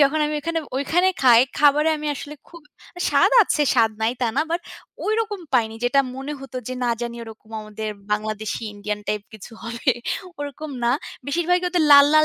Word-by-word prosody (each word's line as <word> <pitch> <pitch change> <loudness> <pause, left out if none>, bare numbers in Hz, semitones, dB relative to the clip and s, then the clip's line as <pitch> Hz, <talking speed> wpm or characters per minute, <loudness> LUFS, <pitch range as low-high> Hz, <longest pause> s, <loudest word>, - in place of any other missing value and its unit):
যখন 290 +2 +4
আমি 300 - -2
ঐখানে, 330 +2 -2 0.2
ঐখানে 350 +7 +2
খাই, 240 -3 +8 0.2
খাবারে 295 +2 +5
আমি 300 0 -5
আসলে 290 +1 -8
খুব 340 -2 -13 0.4
আ - - -7
স্বাদ - - +4
আছে, 300 -5 +1
স্বাদ 225 -2 +4
নাই 225 +2 +2
তা - - +3
না, - - +4
বাট 340 - 0 0.5
ওইরকম 435 -2 -1
পাইনি, 225 -3 +2
যেটা 275 +3 +4 0.2
মনে 270 +2 -5
হতো 270 -1 -9
যে, 255 - -3
না 240 - +2
জানি 235 0 -4
ওরকম 220 0 -13
আমাদের 215 0 -6 0.2
বাংলাদেশি, 215 +1 -2
ইন্ডিয়ান 210 0 -4
টাইপ 210 -1 -1
কিছু 220 +2 -11
হবে, 235 +1 0 0.5
ওরকম 290 +1 -6
না। 235 - +3 0.4
বেশিরভাগই 345 +5 +1
ওদের 350 -2 +2
লাল, 280 0 +10
লাল 310 0 +7
275 Hz, 185 wpm, -22 LUFS, 225-310 Hz, 0.5 s, লাল